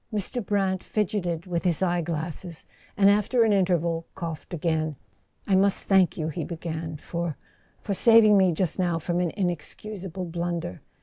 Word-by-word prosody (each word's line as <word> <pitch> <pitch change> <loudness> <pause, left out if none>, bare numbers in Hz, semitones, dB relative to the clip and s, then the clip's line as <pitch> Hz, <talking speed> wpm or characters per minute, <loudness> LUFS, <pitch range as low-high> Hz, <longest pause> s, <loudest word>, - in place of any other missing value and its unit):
Mr. 215 +3 -3
Brant 195 -2 0
fidgeted 180 -5 -2
with 175 -2 -2
his 175 -3 +2
eye¬ 175 -2 +1
glasses, 165 +1 -5 0.3
and 195 -1 +5
after 210 +4 +4
an 220 -2 +3
interval 170 -4 +1
coughed 165 -4 -6
again. 160 -2 -1 0.5
"I 195 - 0
must 195 +1 +3
thank 190 -3 +3
you," 155 -1 -2
he 160 +1 -4
began, 160 -1 -5
"for—for 170 +5 -6
saving 225 0 +6
me 190 -2 +5
just 175 +2 -1
now 175 -2 +1
from 175 +2 -1
an 180 -1 +1
inexcusable 185 +1 -4
blunder. 170 - -4
175 Hz, 150 wpm, -26 LUFS, 165-195 Hz, 0.5 s, saving